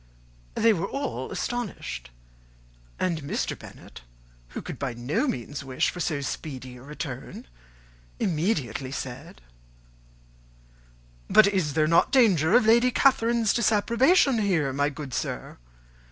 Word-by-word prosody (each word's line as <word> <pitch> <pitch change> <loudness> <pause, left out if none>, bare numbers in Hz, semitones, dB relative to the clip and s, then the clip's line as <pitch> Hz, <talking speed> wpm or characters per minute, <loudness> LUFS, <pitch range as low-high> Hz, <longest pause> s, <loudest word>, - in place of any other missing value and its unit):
They 225 0 +4
were 195 0 -2
all 280 +1 -4
astonished; 220 - -4 0.9
and 170 -4 -1
Mr. 140 - -2
Bennet, - - -13 0.5
who - - -7
could - - -7
by 135 -4 -3
no 125 - -1
means 140 - -4
wish 130 -1 0
for 180 - -9
so 155 -4 -1
speedy 130 -3 -6
a - - -13
return, 140 -2 -7 0.7
immediately 150 - -1
said, 135 - -7 1.9
"But 215 - +7
is 185 -8 0
there 155 -1 +3
not 165 +2 +3
danger 195 - +4
of 245 - +5
Lady 235 +3 +5
Catherine's 235 -4 +3
disapprobation 235 - +3
here, 170 -10 +1
my 145 +2 +1
good 140 -2 -8
sir? - - -4
165 Hz, 125 wpm, -26 LUFS, 140-225 Hz, 1.9 s, But